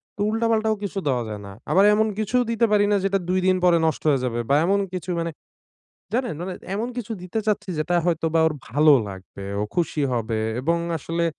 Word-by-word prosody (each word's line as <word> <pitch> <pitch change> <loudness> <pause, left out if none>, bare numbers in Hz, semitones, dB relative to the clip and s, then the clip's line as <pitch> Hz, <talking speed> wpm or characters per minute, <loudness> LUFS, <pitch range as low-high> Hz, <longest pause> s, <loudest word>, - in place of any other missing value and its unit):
তো - - -6
উল্টাপাল্টাও 220 -1 +1
কিছু 200 0 -4
দেওয়া 125 -3 +1
যায় 105 -1 -6
না। - - -9 0.2
আবার 195 +2 +5
এমন 220 +1 +3
কিছু 215 +4 0
দিতে 230 0 +2
পারি 205 -1 +4
না - - +4
যেটা 195 0 +1
২ 185 0 +2
দিন 185 - +4
পরে 175 -2 +5
নষ্ট 160 - -1
হয়ে 135 -3 +2
যাবে 120 -1 -2
বা 140 - +4
এমন 200 +2 +2
কিছু 180 0 -5
মানে 165 0 -2 0.8
জানেন 245 -8 0
মানে 185 +1 -4 0.2
এমন 225 +4 -2
কিছু 230 -2 -4
দিতে 185 +5 -3
চাচ্ছি 205 -3 0
যেটা 170 +3 0
হয়তোবা 165 -1 +1
ওর 160 - +2 0.2
ভালো 150 +1 +5 0.2
লাগবে, 95 +1 -9 0.2
ও - - 0
খুশি 160 -4 0
হবে 115 -2 -1 0.2
এবং 170 +5 +1 0.2
আসলে 170 +3 -2
175 Hz, 205 wpm, -23 LUFS, 150-210 Hz, 0.8 s, আবার